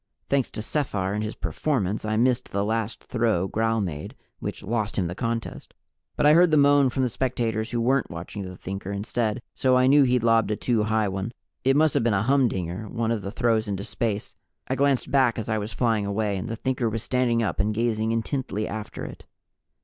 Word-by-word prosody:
Thanks 140 -3 +2
to 105 - -4
Sephar 105 -10 -1
and 105 +1 -1
his 105 - -4
performance, 110 -9 -1
I 110 0 0
missed 125 +1 +2
the 100 +1 0
last 110 0 -2
throw 110 -7 0
Gral 115 +2 0
made, 75 -6 -5 0.2
which - - -5
lost 110 0 -1
him 95 - +1
the 85 - -3
contest. 115 +2 -4 0.4
But - - +1
I 150 - +7
heard 175 +2 +6
the 155 - +4
moan 145 -1 +5
from 130 +1 -1
the - - +3
spectators 115 -3 -1
who 120 - -1
weren't 130 +3 +2
watching 85 +4 -6
the 90 -1 -7
Thinker 95 +1 -5
instead, 110 +2 -2
so 130 -1 +3
I 125 - +4
knew 145 +3 +6
he'd 125 -3 +3
lobbed 115 -2 +3
a 105 - +1
too 110 -1 0
high 110 -1 +1
one. 95 +4 -3 0.3
It 135 +1 +3
must 155 +1 +4
have 140 - +2
been 115 -3 +2
a 95 - +1
humdinger 110 -7 0
one 115 +1 -1
of 115 -3 -1
the 100 - -5
throws 115 0 +1
into 100 -1 -3
space. 110 -2 -3 0.3
I - - 0
glanced 140 -1 +1
back 130 -4 +3
as 110 0 -4
I 110 0 +1
was 105 +2 -4
flying 110 -2 +1
away, 100 0 0
and 95 - -4
the 115 - -3
Thinker 125 0 -1
was 115 0 -3
standing 120 -2 +1
up 110 - -2
and 105 +3 +2
gazing 110 0 0
intently 115 -2 -2
after 110 0 -6
it. - - -10
115 Hz, 220 wpm, -25 LUFS, 105-125 Hz, 0.4 s, I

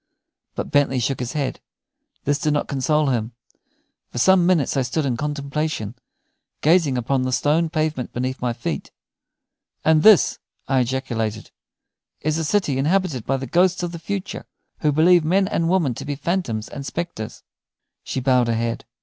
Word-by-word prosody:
But - - -4
Bentley 145 -2 +3
shook 130 +2 -1
his 125 0 -4
head. 140 -3 -2 0.6
This 145 0 +1
did 150 - +1
not 145 - 0
console 145 +2 +1
him. 120 -2 -1 0.8
For - - -9
some 180 +6 +5
minutes 170 -8 +2
I 135 - +2
stood 135 +5 -1
in 130 -3 0
contemplation, 145 -4 -3 0.7
gazing 155 -4 +3
upon 130 +2 0
the 130 0 -1
stone 155 +5 +2
pavement 155 -5 -2
beneath 130 +2 -3
my 125 -1 0
feet. 115 0 -4 1.0
"And 160 -1 +5
this," 215 +1 +6 0.3
I 135 -1 +2
ejaculated, 115 -4 -2 0.7
"is 155 +2 -1
a - - -1
city 150 -6 +1
inhabited 160 - 0
by 135 - +1
the 135 - -5
ghosts 180 +7 +2
of 175 - -2
the 170 - -7
future, 195 +3 -5 0.3
who 150 - +2
believe 170 +3 +5
men 190 +5 +2
and 165 -4 0
women 170 -8 +2
to 135 - -7
be 145 +1 -3
phantoms 140 - -2
and 140 - -7
spectres?" 160 -8 -5 0.6
She - - -3
bowed 125 -2 +3
her 115 - +1
head. 115 +1 -2
145 Hz, 165 wpm, -22 LUFS, 125-165 Hz, 1.0 s, this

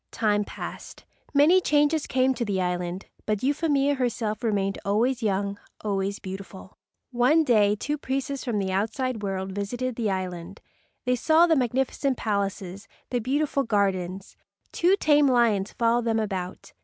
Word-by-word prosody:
Time 210 -2 +1
passed. - - -8 0.3
Many 310 +6 +5
changes 295 -1 +2
came 260 0 +2
to 240 - -3
the 200 -4 -1
island, 180 0 -2 0.2
but 215 0 -1
Euphemia 285 0 +2
herself 235 -4 -2
remained 200 -3 0
always 235 +5 +1
young, 200 -1 -1 0.2
always 200 -1 -1
beautiful. 190 0 -9 0.4
One 255 +7 +4
day 210 -6 +3
two 295 +7 -3
priests 275 0 -3
from 240 -5 -2
the 190 -2 -1
outside 225 +4 -1
world 190 -1 -3
visited 235 +5 -3
the 225 -3 0
island. 185 0 -4 0.5
They 250 0 +2
saw 315 +7 +4
the 330 -2 +3
magnificent 260 +1 0
palaces, 200 -2 -3 0.2
the 245 - +1
beautiful 280 +4 0
gardens. 195 -4 -1 0.4
Two 360 +3 +3
tame 295 -6 +4
lions 230 -6 +2
followed 235 0 +1
them 225 -1 +1
about. 190 -4 -4
225 Hz, 145 wpm, -26 LUFS, 195-265 Hz, 0.5 s, Many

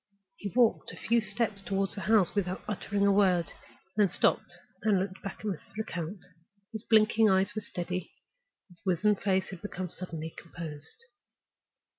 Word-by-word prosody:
He 200 - -4
walked 240 -3 +3
a - - -9
few 235 +1 +2
steps 210 -1 -1
toward 195 0 -1
the 205 - -6
house 210 -3 +3
without 185 -2 -1
uttering 200 0 0
a 200 - +5
word, 185 -4 +3 0.4
then 205 -2 +4
stopped, - - +1 0.2
and 210 -3 +3
looked 185 0 -3
back 195 - -6
at - - -9
Mrs. 195 +1 -5
Lecount. 180 -3 -4 0.5
His 220 -2 -5
blinking 220 -1 +5
eyes 190 +1 +3
were 215 - -3
steady, 180 -2 -4 0.6
and - - -60
his 175 -1 -18
wizen 195 +3 +3
face 190 -1 0
had 185 -3 -8
become 185 -3 -4
suddenly 165 -3 -6
composed. 160 -3 -8
195 Hz, 165 wpm, -30 LUFS, 180-210 Hz, 0.6 s, a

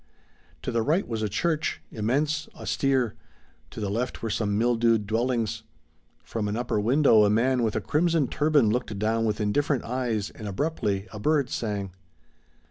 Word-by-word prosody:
To - - -2
the 115 - +1
right 160 - +1
was 115 -2 -3
a 105 - 0
church, 155 - -1
immense, 140 +8 0
austere; 130 -6 0 0.6
to - - -9
the 100 -2 -2
left 120 +4 -3
were 115 - -1
some 105 -1 0
mildewed 115 -2 +2
dwellings; 115 +1 -1 0.6
from 110 -2 -3
an 105 +2 -2
upper 120 -3 -1
window 115 0 +5
a 105 - +4
man 125 +4 +2
with 110 -3 0
a - - 0
crimson 165 -2 +1
turban 150 -7 +3
looked 115 -3 -2
down 110 +2 +1
with 110 -1 -1
indifferent 130 +6 +1
eyes 115 -4 -2
and 110 - -8
abruptly 100 -3 -1
a 105 - -6
bird 145 +2 +1
sang. 105 - -3
115 Hz, 165 wpm, -26 LUFS, 105-135 Hz, 0.6 s, window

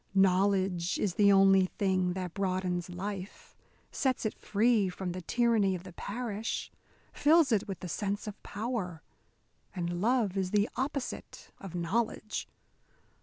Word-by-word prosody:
Knowledge 190 -2 +3
is 195 -4 0
the 200 +1 +5
only 195 -1 +6
thing 185 -2 0
that 180 -2 -4
broadens 185 -2 -1
life, 190 +2 -6 0.4
sets 260 -5 0
it 215 - 0
free 215 -1 +2
from 180 0 -4
the 180 +1 -5
tyranny 220 -1 +2
of 175 - -7
the 185 -2 -10
parish, 220 +2 -4 0.4
fills 310 -1 +4
it 210 -3 +2
with 195 -3 -6
the 180 - -5
sense 200 +4 -2
of 210 -1 -7
power. 205 -7 -4 0.7
And 175 -1 -2
love 225 -3 +2
is 190 -1 0
the 205 +2 +2
opposite 275 0 -4
of 190 -3 -8
knowledge. 215 +5 -1
195 Hz, 140 wpm, -30 LUFS, 185-215 Hz, 0.7 s, only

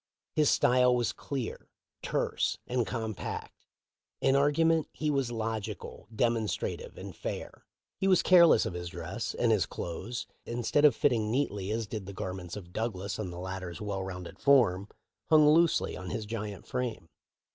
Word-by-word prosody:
His 150 -2 +3
style 125 0 +4
was 120 -2 +1
clear, 135 -5 -5 0.3
terse, - - 0
and 125 -2 0
compact. 110 -4 -5 0.5
In 135 - +3
argument 155 +3 +3
he 155 -1 -1
was 135 -4 0
logical, 110 -2 -4
demon 115 0 +1
strative, - - -4
and - - -8
fair. - - -6 0.3
He 190 - +1
was 185 -2 +5
careless 170 -9 +7
of - - -3
his 90 0 -5
dress, 90 +7 -5
and 120 -2 +2
his 105 -4 +2
clothes, 95 +8 -5 0.2
instead 120 +5 +1
of 140 -6 +6
fitting 115 -6 +2
neatly 105 -6 -1
as 110 +1 -1
did 105 -2 -6
the 100 - -7
gar 95 -1 -4
ments 90 -2 -7
of 90 -4 -9
Douglas 100 -3 -3
on 100 -4 -3
the 85 - -8
latter's 95 -2 -5
well 100 -2 -3
rounded 90 -2 -7
form, 110 -9 +4 0.4
hung 155 -1 +7
loosely 165 +2 +4
on 95 0 -7
his 110 - -3
giant 105 -3 -5
frame. 125 -9 -3
110 Hz, 165 wpm, -30 LUFS, 95-130 Hz, 0.5 s, careless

